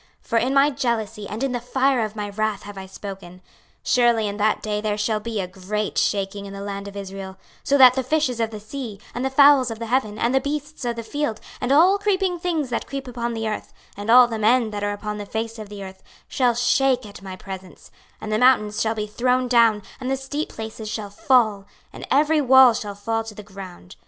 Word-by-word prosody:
26:038:019 - - -28
For 230 - +2
in 255 +4 0
my 275 +1 +5
jealousy 225 -5 -2
and 220 +5 -4
in 270 - 0
the 245 - -2
fire 255 +1 +1
of 215 0 -5
my 210 -1 -4
wrath 215 0 -2
have 205 0 -9
I 190 -1 -8
spoken, 190 -2 -9 0.4
Surely 235 -3 +3
in 200 0 -4
that 215 0 +1
day 210 -1 -2
there 210 -1 -1
shall 215 +1 0
be 220 0 -4
a 185 - -2
great 195 +3 -4
shaking 200 0 -1
in 195 - -9
the 195 - -7
land 200 0 -5
of 200 0 -9
Israel; 195 -1 -7
26:038:020 - - -25 0.3
So 280 - +3
that 255 -2 +9
the 265 - 0
fishes 260 -3 0
of 225 -1 0
the 215 -1 -8
sea, 220 -1 -7
and 245 - -3
the 265 - +1
fowls 280 -2 +6
of 225 - -5
the 230 - -5
heaven, 225 -3 0
and 235 +3 0
the 265 - +4
beasts 295 -1 -4
of 240 -1 -1
the 230 - -5
field, 235 -2 -3 0.2
and 250 - -1
all 360 +8 +5
creeping 385 -3 0
things 325 -7 -2
that 235 - -2
creep 275 -1 -6
upon 240 -1 -3
the 225 0 -2
earth, 215 - -5 0.2
and 205 +2 -7
all 250 +1 +9
the 225 -2 -4
men 225 +1 +3
that 205 -1 -4
are 205 - 0
upon 210 0 -5
the 205 - -5
face 225 +1 -4
of 215 -2 -8
the 205 -1 -8
earth, 190 0 -10 0.3
shall 245 -3 +1
shake 255 +1 +2
at 200 -2 -11
my 190 -1 -7
presence, 190 -1 -10 0.3
and 215 - -6
the 215 - +1
mountains 225 -5 +3
shall 220 0 0
be 210 -1 -2
thrown 250 +4 0
down, 230 -4 +4 0.2
and 255 0 -4
the 270 - 0
steep 285 +3 -4
places 220 -1 -7
shall 210 -2 -5
fall, 225 -7 +2 0.3
and - - -9
every 300 +3 +3
wall 260 -2 +7
shall 205 -3 -5
fall 225 +2 -2
to 220 -1 -10
the 210 - -9
ground. 190 - -11
225 Hz, 240 wpm, -23 LUFS, 205-255 Hz, 0.4 s, that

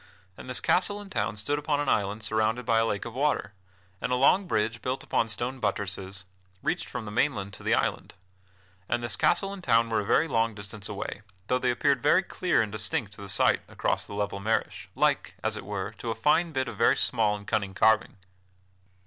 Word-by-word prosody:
And 130 - -11
this 125 - +1
castle 200 +3 +2
and 205 -1 -11
town 105 -2 -1
stood 145 +8 0
upon 145 0 0
an 145 - -1
island 105 +1 0
surrounded 110 +3 0
by 115 0 +3
a 115 - +3
lake 100 -2 -2
of 120 - -7
water, 135 -7 0 0.5
and - - -2
a - - +3
long 180 +9 +4
bridge, 115 -4 0
built 130 +1 -3
upon 115 - +1
stone 120 +5 -4
buttresses, 95 -4 -3 0.4
reached - - -1
from 125 -3 -5
the 105 - -6
mainland 105 -5 0
to - - -10
the - - +2
island. - - -2 0.7
And 120 +1 0
this 120 - 0
castle 195 0 +2
and 195 -2 -9
town 115 -3 +3
were 110 - +2
a - - -1
very 150 +10 +3
long 115 -5 +1
distance 100 0 -8
away, 100 0 -5 0.2
though 125 +4 +1
they 125 - +1
appeared 130 +2 +2
very 185 +9 +4
clear 180 -9 +1
and 105 - -5
distinct 105 0 -2
to 105 - -12
the 100 - -7
sight 100 - +3
across - - -1
the 100 - -7
level 100 -1 -2
marish, 110 +3 -2
like, - - +1
as - - 0
it - - -7
were, - - -4
to 115 - -4
a 115 - -1
fine 150 +8 +2
bit 130 -3 -1
of - - -7
very 115 - +4
small 110 -4 +2
and 100 0 -9
cunning 100 -3 -1
carving. 110 0 +3
115 Hz, 215 wpm, -27 LUFS, 105-130 Hz, 0.7 s, long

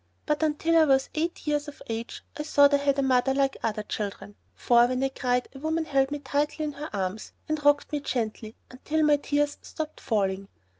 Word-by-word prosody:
But 300 0 0
until 315 +2 +2
I 320 - +6
was 270 -2 +2
eight 330 +2 -2
years 295 0 0
of 295 - -10
age 230 +1 -5
I - - -4
thought 285 -1 +4
I - - +6
had 280 0 +1
a 275 - +2
mother 265 0 +2
like 275 -1 +1
other 215 -1 -2
children, 205 -1 -5 0.2
for 240 -1 +4
when 255 +1 -1
I 270 - +2
cried 250 -2 -1
a 270 - -10
woman 320 +2 -1
held 270 -3 +2
me 290 - -3
tightly 290 +2 -1
in 300 - -2
her 295 +2 -7
arms 195 +1 -4
and 310 -1 -2
rocked 290 0 +3
me 295 - -1
gently 225 -5 -3 0.2
until 310 +5 -1
my 300 -1 +5
tears 290 0 -1
stopped 310 -1 -6
falling. 195 -3 -1
280 Hz, 210 wpm, -27 LUFS, 245-300 Hz, 0.2 s, I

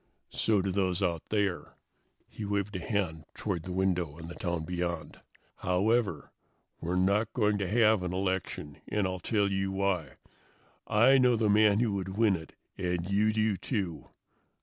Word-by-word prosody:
"So 105 -4 +1
do 95 - -1
those 95 0 0
out 85 -3 0
there." 100 -4 -1 0.5
He 110 - -8
waved 100 0 -2
a - - -2
hand 85 -5 -2
toward 95 -6 -2
the 90 - -7
window 90 -4 0
and 85 0 -8
the - - -6
town 85 -3 -3
beyond. 85 -2 -4 0.4
"However, 105 +5 0 0.5
we're 85 +2 -2
not 100 +4 +2
going 105 -3 +2
to 100 - -1
have 110 0 +4
an 90 -1 -3
election, 95 -6 -3
and 105 -2 0
I'll 95 0 -2
tell 100 +2 +1
you 95 0 -1
why. 95 -6 -1 0.7
I 130 +6 +5
know 125 -1 +4
the 110 -2 +2
man 105 0 +5
who 115 -3 +1
would 95 0 -4
win 110 -4 +4
it 80 -2 -9 0.2
and 90 -2 -1
you 105 +2 +3
do, 110 -1 +1
too. 95 - -3
95 Hz, 170 wpm, -30 LUFS, 90-105 Hz, 0.7 s, I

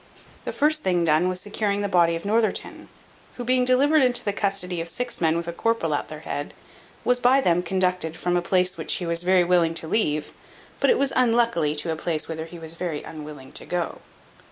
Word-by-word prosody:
The - - -2
first 305 +1 +2
thing 175 -2 +1
done 160 +3 +3
was 185 0 -2
securing 205 0 -2
the 205 - -1
body 170 -3 +3
of 165 - -7
Northerton, 220 +2 -1 0.5
who 245 - -5
being 250 +1 +2
delivered 280 +5 +4
into 245 -2 +2
the 205 - 0
custody 195 -4 -1
of 165 - -5
six 245 +4 -4
men 165 0 +2
with 170 0 -4
a 170 - -3
corporal 230 -5 0
at 145 - -2
their 155 0 -9
head, 145 -2 -5 0.5
was 250 0 +3
by 250 +2 +4
them 175 -8 +2
conducted 180 -2 -1
from 175 0 -1
a 175 - +2
place 180 +1 +1
which - - 0
he 180 - -4
was 170 0 +2
very 180 0 +3
willing 170 -2 +2
to 160 - -2
leave, 150 -6 0 0.5
but - - +3
it 480 - +4
was 275 -1 0
unluckily 230 -11 +2
to 160 +2 -1
a - - -1
place 160 -1 -2
whither 160 -1 -5
he 170 +1 -11
was 160 -1 -3
very 170 -3 -4
unwilling 150 -4 -9
to - - -2
go. 175 -2 -3
180 Hz, 220 wpm, -24 LUFS, 165-225 Hz, 0.5 s, delivered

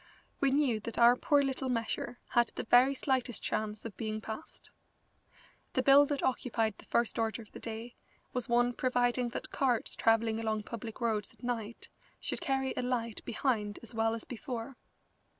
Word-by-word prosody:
We 275 - +3
knew 265 -5 +2
that 225 +2 -6
our 240 +1 +7
poor 285 +2 +3
little 265 -1 -1
measure 240 0 -2
had 240 -1 +4
the - - -3
very 250 +4 +5
slightest 260 -3 0
chance 215 0 -2
of 230 - -6
being 215 -1 -2
passed. 220 +8 -8 1.0
The - - +1
bill 280 +1 +7
that 285 -1 -2
occupied 230 -4 0
the - - -13
first 235 -1 +1
order 225 +1 -1
of 210 - -21
the - - -9
day 230 +1 -6 0.4
was 250 -1 -2
one 240 +1 +3
providing 245 -1 +1
that 235 - -6
carts 250 -4 +1
travelling 225 0 +2
along 220 -1 -1
public 230 +1 -7
roads 220 -3 0
at - - -25
night 230 -2 -4 0.3
should - - -3
carry 265 -1 0
a - - -1
light 240 -3 -2
behind 215 -4 -1
as 230 - -7
well 225 0 +1
as 230 - -5
before. 250 0 -6
235 Hz, 175 wpm, -32 LUFS, 225-255 Hz, 1.0 s, our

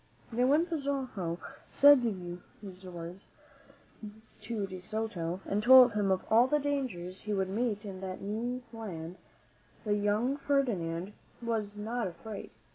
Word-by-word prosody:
Now, 245 +2 +2
when 300 +5 +4
Pizarro 270 - -2 0.3
said 285 -2 +7
these 185 -2 -6
words 175 +2 -8 1.1
to 215 -1 -3
De 185 -1 -7
Soto 185 -3 -3
and 205 +1 0
told 255 +1 +9
him 205 -2 +1
of 190 -1 +1
all 230 +3 +5
the 295 - +3
dangers 255 -12 -3
he 210 - -3
would 190 -1 0
meet 215 0 -1
in 190 -2 -7
that 185 -1 -5
new 235 +5 -3
land, 180 -6 -6 0.7
the 210 - +1
young 210 +6 +1
Ferdinand 205 -11 0 0.3
was 220 -3 -2
not 220 +2 -2
afraid. 205 +4 -8
210 Hz, 135 wpm, -31 LUFS, 185-245 Hz, 1.1 s, told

